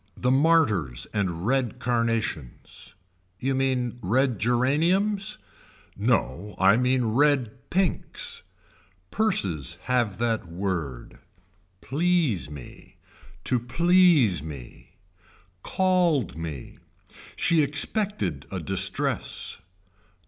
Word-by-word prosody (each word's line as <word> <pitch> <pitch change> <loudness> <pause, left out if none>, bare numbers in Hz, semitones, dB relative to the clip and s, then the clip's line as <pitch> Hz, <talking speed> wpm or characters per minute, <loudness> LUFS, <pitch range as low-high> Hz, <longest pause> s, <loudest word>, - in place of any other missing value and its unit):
The 125 - +1
martyrs 130 - +2
and 90 -4 -2
red 130 -1 0
carnations. 115 - -3 0.4
You 135 +2 -1
mean 130 -2 -1
red 125 +3 +1
geraniums. 165 - +1 0.6
No 85 +13 -1
I 95 +2 +5
mean 125 +1 +1
red 130 0 +1
pinks. 185 -2 -1 0.7
Purses 100 - 0
have 120 -7 0
that 115 -4 -1
word. 85 -8 -4 0.6
Please 155 - 0
me. 75 -4 -12 0.5
To 125 - +1
please 160 - +3
me. 70 -5 -11 0.6
Called 175 - +1
me. 80 -5 -7 0.6
She 165 -2 +3
expected 150 - 0
a - - -3
distress. - - 0
125 Hz, 85 wpm, -25 LUFS, 95-150 Hz, 0.7 s, I